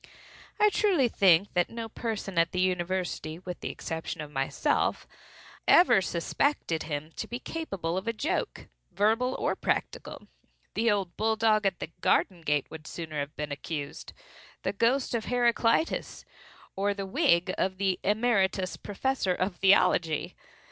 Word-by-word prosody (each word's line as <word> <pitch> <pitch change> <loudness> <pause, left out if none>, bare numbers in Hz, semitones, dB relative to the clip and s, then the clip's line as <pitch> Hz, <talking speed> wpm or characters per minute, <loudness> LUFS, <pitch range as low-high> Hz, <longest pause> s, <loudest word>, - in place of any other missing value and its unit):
I 420 0 +5
truly 370 - +3
think 195 -3 +4
that 175 0 +1
no 230 0 -5
person 215 -5 -3
at 165 0 +2
the 180 - -1
university, 180 -3 -1
with 180 0 -7
the - - -4
exception 160 0 -5
of 150 -1 -6
myself, 135 -1 0 0.6
ever 345 - +6
suspected 170 - -1
him 155 0 -4
to - - -4
be 240 - -4
capable 195 - -4
of 190 - -4
a - - +2
joke, 285 +9 -3 0.2
verbal 225 +5 +1
or - - 0
practical:—the 230 +1 -4
old 195 -4 0
bull 220 +1 +1
dog 215 -2 +3
at 190 - -1
the 165 - -6
garden 175 0 +2
gate 150 -3 +1
would 160 0 -9
sooner 155 -3 -5
have 145 +1 -4
been 150 -1 -4
accused,—the 145 +4 -7
ghost 245 +6 +1
of 230 -2 -1
Heraclitus,—or 235 -4 -1
the 195 -1 -4
wig 190 - +2
of 190 0 -1
the 190 -1 0
Emeritus 195 -4 +1
Professor 205 -2 -1
of 185 0 -2
Theology. 180 -4 +3
190 Hz, 140 wpm, -28 LUFS, 170-230 Hz, 0.6 s, ever